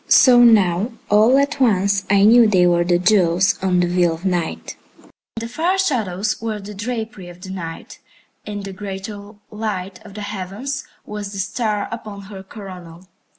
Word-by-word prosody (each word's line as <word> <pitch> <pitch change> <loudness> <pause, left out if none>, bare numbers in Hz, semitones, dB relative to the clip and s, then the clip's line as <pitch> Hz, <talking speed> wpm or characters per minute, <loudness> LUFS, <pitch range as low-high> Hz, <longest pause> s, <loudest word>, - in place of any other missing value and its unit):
So 250 -2 +7
now 210 -1 +4 0.2
all 220 +5 +5
at 280 +1 0
once 200 -5 +2
I 200 0 +4
knew 230 +2 +7
they 185 -4 +4
were 175 -1 +3
the 175 0 +2
jewels 185 0 +3
on 180 -2 +2
the 175 - +1
veil 175 -1 +1
of 165 +4 -12
Night. 175 -3 -2 0.6
And 225 - -5
the - - -4
far 340 +10 0
shadows 220 - -1
were 220 -2 -3
the 205 +1 -9
drapery 220 -2 -5
of 175 0 -13
the 190 +1 -9
Night, 165 -3 -8 0.4
and 205 -1 -6
the 195 -1 -7
greater 200 +1 -7 0.2
light 200 -4 -5
of 200 -2 -13
the 210 - -6
heavens 210 +8 -5 0.2
was 210 -1 -6
the - - -6
star 210 +1 -2
upon 215 -3 -7
her 195 -1 -10
coronal. 185 -3 -11
200 Hz, 175 wpm, -20 LUFS, 185-220 Hz, 0.6 s, So